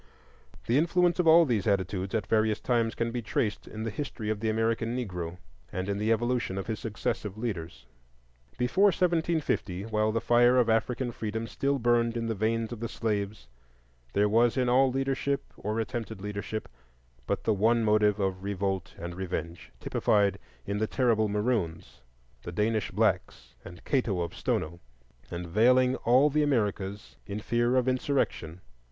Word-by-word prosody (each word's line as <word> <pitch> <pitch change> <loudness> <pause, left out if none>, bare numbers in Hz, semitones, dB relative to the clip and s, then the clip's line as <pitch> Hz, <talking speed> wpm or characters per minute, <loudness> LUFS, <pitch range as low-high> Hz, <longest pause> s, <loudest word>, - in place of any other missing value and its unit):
The 120 +4 +3
influence 175 +2 +2
of 175 - +2
all 165 +1 +8
of - - -1
these 110 -6 0
attitudes 95 -1 0
at 105 -2 0
various 110 -1 +1
times 115 -2 0
can 115 0 -1
be 120 0 -3
traced 105 0 -2
in 110 0 -6
the 115 - -3
history 110 -3 -4
of 110 - -2
the 110 +1 -1
American 115 +2 0
Negro, 90 -7 -4 0.3
and 95 +1 -3
in 100 0 -1
the 110 +2 +1
evolution 120 -3 0
of 95 - -3
his 110 -1 -3
successive 105 -1 -3
leaders. 95 - -5 0.7
Before 125 +11 +2
1750, 165 - +1
while 110 0 0
the 115 - 0
fire 120 +2 +4
of 120 -2 +4
African 120 +2 0
freedom 110 0 -4
still 140 +4 -1
burned 120 -1 +2
in 115 - -2
the 115 - -1
veins 110 +2 -1
of 120 - -6
the 115 0 -4
slaves, 105 -2 -3 0.7
there 100 +1 +3
was 115 +4 +3
in 125 -1 +2
all 130 +1 +4
leadership 135 +1 -1
or 110 +2 -3
attempted 115 -2 -4
leadership 105 +2 -5 0.6
but - - -1
the 110 - +2
one 115 +3 +2
motive 105 -1 +3
of 95 -1 -1
revolt 95 -3 -2
and 85 +1 -6
revenge,—typified 95 +3 -1 0.3
in 100 +1 -2
the 110 - 0
terrible 115 -4 +2
Maroons, 105 - -2 0.4
the - - -7
Danish 105 +3 0
blacks, - - -1
and 90 - -12
Cato 115 -10 0
of 85 - -3
Stono, 85 - -2 0.5
and 85 0 -5
veiling 125 +8 +4
all 130 +5 +4
the 150 +2 +2
Americas 105 -7 -1
in 100 +1 -4
fear 120 +3 +1
of 130 -1 +2
insurrection. 125 - -1
110 Hz, 165 wpm, -28 LUFS, 100-125 Hz, 0.7 s, all